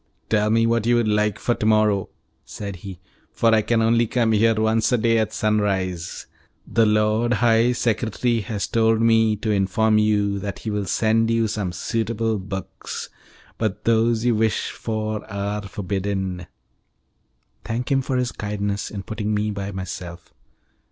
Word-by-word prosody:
"Tell 105 -1 +2
me 115 +1 +3
what 115 -1 +1
you 120 - +4
would 120 -2 +2
like 105 -1 +1
for 120 - 0
to 110 - -4
morrow," 105 -3 +2 0.3
said 100 -2 -7
he, 95 -1 -9 0.3
"for 115 -1 +2
I 110 - +4
can 115 +1 +1
only 115 +1 +3
come 115 -1 +1
here 110 +1 +3
once 110 +1 +1
a 125 - +3
day 115 0 +2
at 110 - 0
sunrise. 95 -5 -1 0.4
The 115 -1 +2
Lord 105 +3 +2
High 115 +1 +3
Secretary 115 0 0
has 100 -1 -3
told 115 +1 +2
me 115 -1 +4
to 110 +1 -2
inform 105 +2 +2
you 105 -2 +1
that 100 0 -5
he 110 - -5
will 105 -2 -2
send 115 +4 +2
you 115 -1 +2
some 105 -4 -2
suitable 115 +3 -1
books, 95 0 -6 0.5
but 110 -4 -2
those 115 0 +2
you 120 - +3
wish 110 -1 0
for 110 -1 -3
are 100 +1 -2
forbidden." 95 -2 -3 1.2
"Thank 120 +3 -3
him 135 -1 +3
for 130 0 -2
his 125 -1 0
kindness 105 -1 -3
in 100 -2 -6
putting 110 0 -3
me 105 +1 0
by 100 0 -4
myself." 90 -2 -7
110 Hz, 165 wpm, -22 LUFS, 100-115 Hz, 1.2 s, you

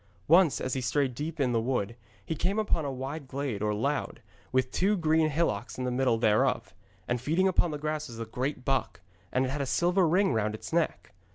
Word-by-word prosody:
Once, 170 -1 +5
as 130 - -2
he 130 - -1
strayed 130 +1 +1
deep 150 +5 -5
in 130 -3 +2
the 115 -1 +1
wood, 115 -3 -1 0.3
he - - -2
came 185 +6 -1
upon 210 -7 +1
a 140 - -2
wide 135 +3 -5
glade 130 -6 -3
or 105 0 +1
laund, 135 +7 -1 0.3
with 130 0 +1
two 200 +3 +2
green 160 -1 +3
hillocks 130 -9 -1
in 130 - -3
the 125 - -1
middle 125 -2 +2
thereof. 110 -2 +2 0.3
And 125 -1 -1
feeding 165 +8 +2
upon 175 -2 +2
the 150 - -3
grass 155 +1 -3
was 115 -1 -9
a 115 - -3
great 125 +3 -3
buck, 135 -6 -1 0.3
and 130 +1 +2
it - - -2
had 145 +1 -2
a 140 - -2
silver 175 +5 +2
ring 180 -1 +3
round 110 -1 0
its - - -9
neck. - - -1
135 Hz, 220 wpm, -29 LUFS, 125-160 Hz, 0.3 s, Once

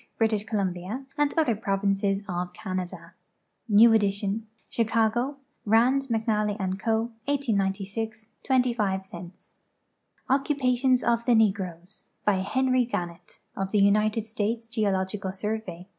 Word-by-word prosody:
British 215 -2 +1
Columbia, 200 +3 -3
and 295 -1 +2
other 300 -9 +3
provinces 195 0 0
of 180 -1 -3
Canada. 185 -2 -5 0.6
New 220 +2 +7
edition. 205 +1 0 0.2
Chicago: 230 +4 +1 0.3
Rand, 245 +6 +3
McNally 215 -2 0 0.2
& - - -17
Co. 225 +3 0
1890. 215 -6 -1 0.3
25 235 -7 +1
cents. 175 -1 -11 0.8
Occupations 260 -2 +2
of 235 0 +1
the 245 - +4
Negroes. 190 -5 -1 0.2
By 205 -2 +3
Henry 255 +5 +2
Gannett, 175 -6 -5
of 195 0 -3
the 210 - +2
United 210 +2 +3
States 225 +1 -3
Geo 220 -3 +1
logical 190 0 -2
Survey. 195 -3 -5
215 Hz, 115 wpm, -26 LUFS, 195-235 Hz, 0.8 s, New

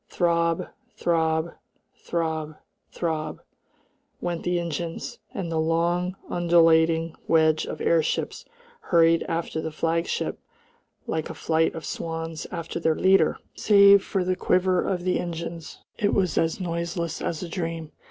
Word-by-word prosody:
Throb, 170 -1 +1 0.3
throb, 160 -1 +1 0.4
throb, 160 -2 -3 0.4
throb, 155 -2 -3 0.8
went 175 -1 -3
the 175 0 0
engines, 170 0 -4
and 175 -4 -4
the 160 - 0
long, 170 +3 +1
undulating 165 -1 +3
wedge 160 -1 +3
of - - -5
airships 160 -2 0 0.4
hurried 165 - +4
after 165 -1 -2
the 160 - -3
flagship 165 +2 -1 0.7
like 160 -1 -2
a - - -6
flight 160 0 +1
of 165 - -6
swans 165 -1 -4
after 170 -1 -5
their 160 -1 +2
leader. 190 -3 +4 0.2
Save 200 -1 +6
for 190 - -1
the 185 0 0
quiver 185 0 +2
of 180 -2 -2
the 185 0 +1
engines 170 -1 -6 0.2
it 205 - +2
was 185 -3 +1
as 165 +2 +1
noiseless 170 -1 -3
as 165 +1 -3
a - - -4
dream. 165 -3 -4
165 Hz, 135 wpm, -25 LUFS, 160-175 Hz, 0.8 s, Save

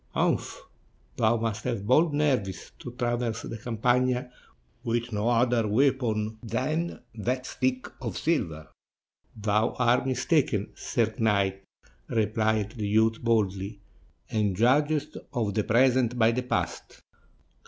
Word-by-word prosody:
"Umph! - - 0 0.5
thou 115 +1 +3
must 115 -1 -2
have 115 -5 -2
bold 155 +8 +4
nerves 130 -11 0
to 125 - -7
traverse 120 -2 -2
the 115 - -6
Campagna 125 +2 0 0.5
with 120 -1 -2
no 105 +3 0
other 120 -1 +2
weapon 110 -3 +1
than 140 +9 -2
that 125 +4 -2
stick 130 0 -1
of 115 -6 -4
silver!" 80 - -1 0.7
"Thou 105 +2 +1
art 125 +1 +3
mistaken, 130 - +1
sir 110 -2 -1
knight," 100 -3 +1 0.5
replied 110 -1 0
the 110 -4 -4
youth 110 +2 +2
boldly, 100 -3 0 0.5
"and 105 -3 +1
judgest 145 +7 +2 0.2
of 110 -6 -1
the 105 +1 +1
present 125 +1 +3
by 115 -1 +4
the 125 +2 -1
past. 125 - -3
115 Hz, 120 wpm, -27 LUFS, 110-125 Hz, 0.7 s, bold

